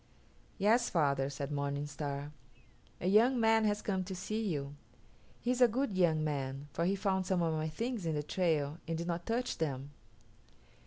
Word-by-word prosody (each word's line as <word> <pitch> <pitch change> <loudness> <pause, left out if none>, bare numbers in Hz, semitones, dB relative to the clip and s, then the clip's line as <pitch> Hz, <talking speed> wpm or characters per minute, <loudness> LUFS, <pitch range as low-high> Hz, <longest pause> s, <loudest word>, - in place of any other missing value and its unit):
"Yes, 220 +4 +3
father," 140 -5 +2
said 140 +1 -5
Morning 140 0 -1
Star, 145 0 -4 0.7
"a - - -5
young 235 +6 +5
man 225 -1 +4
has 205 0 0
come 190 -2 0
to 190 0 -5
see 215 +4 -3
you. 140 -5 -2 0.7
He 245 - +1
is 255 0 -1
a 245 - +9
good 235 -2 -1
young 165 -4 +3
man, 140 -2 -3
for 170 - 0
he 195 +3 +2
found 190 -2 0
some 180 -2 +2
of 165 -1 +1
my 155 0 -1
things 225 +2 -3
in 160 - 0
the 150 - -1
trail 155 -3 0
and 165 0 -1
did 170 - -3
not 170 0 -3
touch 240 +2 -1
them." 140 -3 -2
170 Hz, 190 wpm, -33 LUFS, 145-210 Hz, 0.7 s, a